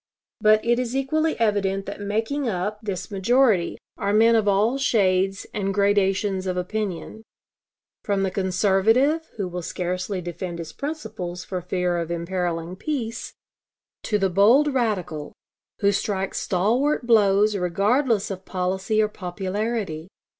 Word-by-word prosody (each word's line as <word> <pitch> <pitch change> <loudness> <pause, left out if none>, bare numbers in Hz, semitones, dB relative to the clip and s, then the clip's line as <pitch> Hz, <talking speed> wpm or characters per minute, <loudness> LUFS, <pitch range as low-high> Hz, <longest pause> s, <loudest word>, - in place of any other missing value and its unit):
But 215 0 +4
it 240 +1 +3
is 250 0 -2
equally 310 +4 0
evident 195 -3 +1
that 200 0 -7
making 225 +7 -1
up 205 +2 -2
this 190 -4 -5
majority 210 -1 +2 0.2
are 200 -1 0
men 225 +2 +5
of 220 -2 +2
all 210 +7 +2
shades 195 -6 +2
and 195 -2 -1
gradations 200 -1 +1
of 180 0 -1
opinion, 205 +2 -4 0.8
from 200 -2 0
the 190 - 0
conservative 205 - +2
who 200 -3 -2
will 180 0 -5
scarcely 180 +3 -3
defend 175 0 -5
his 165 -2 -7
principles 185 - -5
for 185 -2 -4
fear 180 0 -1
of 170 -1 -3
imperiling 170 0 -2
peace, 230 -3 -4 0.7
to 210 - 0
the 195 -2 +1
bold 240 +10 +5
radical 185 - -2 0.5
who 200 0 +4
strikes 195 -1 -2
stalwart 240 +10 +1
blows 210 -2 +4
regardless 200 +5 +1
of 190 0 -6
policy 190 +4 0
or - - +2
popularity. 190 -2 -3
200 Hz, 135 wpm, -24 LUFS, 185-225 Hz, 0.8 s, men